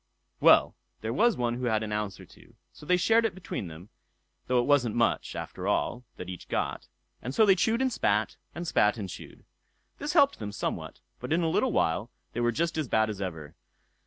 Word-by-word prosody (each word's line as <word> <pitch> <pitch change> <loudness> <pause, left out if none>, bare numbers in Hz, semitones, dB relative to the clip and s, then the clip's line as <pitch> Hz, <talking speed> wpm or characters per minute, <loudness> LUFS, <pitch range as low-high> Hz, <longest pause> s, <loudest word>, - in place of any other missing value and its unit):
Well! - - +6 0.3
there 110 +2 -2
was 235 - +3
one 120 -1 0
who 125 +1 -3
had 110 -2 +1
an 105 - -5
ounce 105 -2 -3
or - - -11
two; - - -20 0.2
so 150 - -14
they 180 - +4
shared 225 +6 +4
it 225 -5 -1
between 175 - -5
them, 85 +5 -11 0.6
though 125 -1 +3
it 120 - +1
wasn't 135 -6 +3
much, 120 -1 +1
after - - -5
all, 125 - 0
that 90 - -7
each 90 -2 -8
got; - - -2 0.3
and 130 +2 -5
so 220 - +6
they 195 - +7
chewed 225 +7 +1
and 260 -2 0
spat, 105 - +1 0.2
and 170 +1 -4
spat 105 -9 +2
and 100 -3 -4
chewed. - - -11 0.5
This 295 +4 -3
helped 285 -4 +4
them 105 -1 -5
somewhat; 105 - -4 0.2
but - - -6
in 170 +2 +2
a 165 - +2
little 255 +9 +1
while 105 - 0 0.2
they 120 - -3
were 120 0 +2
just 165 +5 -1
as 150 - -1
bad 110 -1 +2
as 100 -1 -7
ever. 80 -5 -5
120 Hz, 220 wpm, -28 LUFS, 105-175 Hz, 0.6 s, they